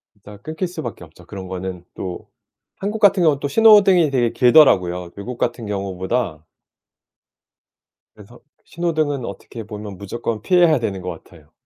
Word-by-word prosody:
이따가 105 0 -14
끊길 160 +4 -4
수 175 -2 -7
밖에 120 - -7
없죠 85 +1 -16
그런 95 0 -8
거는 90 -1 -6
또. 90 -2 -7 0.5
한국 210 +3 -4
같은 200 -3 +4
경우는 150 -4 +3
또 140 - -2
신호등이 195 -4 +5
되게 120 -4 +1
길더라고요 90 - +4
외국 115 +5 -7
같은 120 -1 -2
경우보다 95 -3 -3 1.7
그래서 110 +3 -16 0.2
신호등은 155 -6 -2
어떻게 115 +3 -8
보면 105 -2 -8
무조건 110 +2 -5
피해야 175 - +4
되는 100 -5 -3
것 90 - -5
같아요. 80 -4 -20
115 Hz, 340 characters per minute, -20 LUFS, 95-155 Hz, 1.7 s, 신호등이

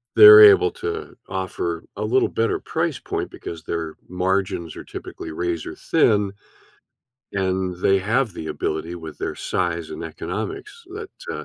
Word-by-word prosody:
they're 430 0 +11
able 415 0 +8
to 430 -2 -5
offer 95 -3 -3
a - - -2
little 125 +5 +2
better 115 0 0
price - - -2
point - - -4
because 80 -2 -8
their 80 -2 -4
margins 90 -2 -1
are - - -8
typically 80 - -8
razor 85 -1 -3
thin, 105 -2 +2 1.0
and 95 -1 -1
they 95 0 +4
have 110 +4 0
the 80 - -7
ability 80 +3 -3
with 80 -3 -9
their - - -3
size 85 -3 -2
and - - -6
economics 400 - -6
that, 425 -2 -7 0.2
uh - - -6
95 Hz, 145 wpm, -22 LUFS, 85-135 Hz, 1.0 s, they're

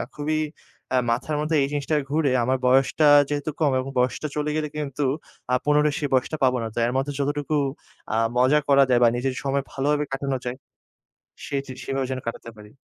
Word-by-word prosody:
খুবই 155 +1 -1 0.6
আ - - +4
মাথার 150 +6 -1
মধ্যে 155 +1 0
এই 135 - +2
জিনিসটা 145 +1 -1
ঘুরে। 150 -2 +1
আমার 130 +2 +1
বয়সটা 135 +4 +4 0.2
যেহেতু 145 +1 -2
কম 150 -3 +3
এবং 130 - -4
বয়সটা 125 +4 0
চলে 150 0 -1
গেলে 155 -1 -1
কিন্তু 145 -1 -3 0.5
আ - - +2
পুনরায় 150 0 +3
সেই 145 -3 -2
বয়সটা 130 +4 +1
পাবো 130 -1 +3
না। 115 - -2
তাই 115 - 0
এর 125 - -2
মধ্যে 145 +2 -1
যতটুকু 145 +2 -1 0.6
আ - - +1 0.2
মজা 130 +4 +4
করা 140 0 +6
যায় 125 -1 +4
বা - - +7
নিজের 130 +1 -1
সময় 140 0 0
ভালোভাবে 145 +2 0
কাটানো 135 0 -2
যায় 125 +1 -3 0.9
সেই 140 -1 -1
যে 130 - -7
সেভাবে 135 -1 -2
যেন 130 - -2
কাটাতে 115 0 -5
পারি। 105 0 -13
140 Hz, 195 wpm, -24 LUFS, 130-150 Hz, 0.9 s, বা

